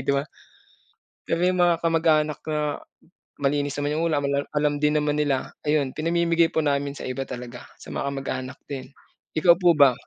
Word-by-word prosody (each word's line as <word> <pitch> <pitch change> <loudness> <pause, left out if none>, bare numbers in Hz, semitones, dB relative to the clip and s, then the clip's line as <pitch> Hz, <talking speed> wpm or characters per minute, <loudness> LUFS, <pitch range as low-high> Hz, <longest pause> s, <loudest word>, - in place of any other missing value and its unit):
di 140 - +3
ba? 140 - 0 1.0
Pero 165 +1 0
yung 180 0 +2
mga 175 -2 +3
kamag-anak 160 -2 +2
na, 150 -2 -1 0.6
malinis 145 0 0
naman 145 0 -1
yung 160 +2 0
ulam 145 -3 0 0.3
alam 150 0 +2
din 150 0 +2
naman 150 0 +1
nila, 140 -3 0 0.2
ayun 145 -3 +2
pinamimigay 170 +1 +2
po 160 - -1
namin 140 -1 0
sa - - -7
iba 135 +1 -4
talaga, 125 0 -8
sa - - -11
mga 140 - -2
kamag-anak 135 -2 -4
din, 135 -3 -7 0.5
ikaw 170 +2 +6
po 175 -3 +5
ba? 140 -3 +7
150 Hz, 175 wpm, -24 LUFS, 140-160 Hz, 1.0 s, ba